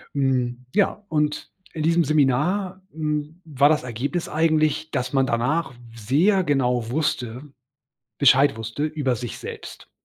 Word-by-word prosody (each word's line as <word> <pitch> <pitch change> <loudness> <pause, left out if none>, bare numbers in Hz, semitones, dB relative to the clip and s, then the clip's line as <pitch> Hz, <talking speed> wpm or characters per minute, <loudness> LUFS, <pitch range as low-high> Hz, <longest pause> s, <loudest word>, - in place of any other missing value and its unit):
Hm, 125 -2 0
ja, 210 0 +1
und 150 -1 -1 0.2
in 155 - -3
diesem 165 0 +3
Seminar, 155 +7 +1
hm, 150 +2 -3
war 145 -3 +3
das 150 -4 +2
Ergebnis 125 +8 -3
eigentlich, 155 -1 +1
dass 125 -1 -2
man 135 -1 +2
danach 125 +6 0 0.2
sehr 155 - +2
genau 125 -5 +1
wusste 125 -3 -2 0.7
Bescheid 135 -2 +5
wusste 115 +6 -4
über 150 -5 -1
sich 120 -1 -6
selbst. - - -9
145 Hz, 130 wpm, -23 LUFS, 125-155 Hz, 0.7 s, Bescheid